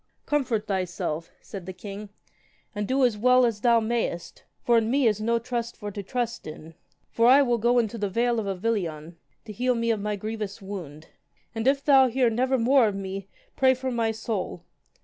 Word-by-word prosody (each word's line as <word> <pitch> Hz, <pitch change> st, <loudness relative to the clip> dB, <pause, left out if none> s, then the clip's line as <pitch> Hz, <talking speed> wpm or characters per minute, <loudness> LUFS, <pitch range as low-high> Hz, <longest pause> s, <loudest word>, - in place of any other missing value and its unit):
Comfort 250 Hz, -8 st, 0 dB
thyself, 175 Hz, -4 st, -3 dB
said 190 Hz, -4 st, -9 dB
the 185 Hz, -, -5 dB
king, 200 Hz, +2 st, -8 dB, 0.6 s
and 205 Hz, -1 st, -3 dB
do 265 Hz, 0 st, +3 dB
as 220 Hz, -4 st, 0 dB
well 250 Hz, +2 st, +5 dB
as 220 Hz, -3 st, -2 dB
thou 235 Hz, -1 st, +4 dB
mayest, 220 Hz, -6 st, -3 dB, 0.2 s
for 235 Hz, -1 st, +4 dB
in 225 Hz, 0 st, -2 dB
me 270 Hz, +1 st, +2 dB
is 215 Hz, -2 st, +2 dB
no 235 Hz, +2 st, +1 dB
trust 235 Hz, 0 st, -4 dB
for 205 Hz, -1 st, -6 dB
to 200 Hz, -, -5 dB
trust 235 Hz, +1 st, -3 dB
in. 155 Hz, +1 st, -10 dB, 0.4 s
For 230 Hz, +1 st, +3 dB
I 270 Hz, +3 st, +7 dB
will 240 Hz, -1 st, +2 dB
into 230 Hz, -1 st, 0 dB
the 205 Hz, -1 st, -1 dB
vale 235 Hz, +3 st, +1 dB
of 210 Hz, -, -3 dB
Avilion, 180 Hz, -6 st, -3 dB, 0.3 s
to 215 Hz, -, -8 dB
heal 250 Hz, +4 st, 0 dB
me 230 Hz, 0 st, 0 dB
of 215 Hz, -3 st, -1 dB
my 210 Hz, 0 st, -2 dB
grievous 210 Hz, 0 st, -5 dB
wound. 175 Hz, -7 st, -8 dB, 0.4 s
And 225 Hz, +2 st, -2 dB
if 275 Hz, +1 st, +2 dB
thou 270 Hz, -2 st, +6 dB
hear 245 Hz, -1 st, +2 dB
never 255 Hz, +3 st, +1 dB
more 250 Hz, 0 st, +4 dB
of 205 Hz, -, -2 dB
me, 195 Hz, 0 st, -5 dB, 0.3 s
pray 260 Hz, -1 st, +4 dB
for 260 Hz, 0 st, -4 dB
my 230 Hz, -2 st, 0 dB
soul. 220 Hz, -5 st, -4 dB
225 Hz, 195 wpm, -26 LUFS, 200-245 Hz, 0.6 s, I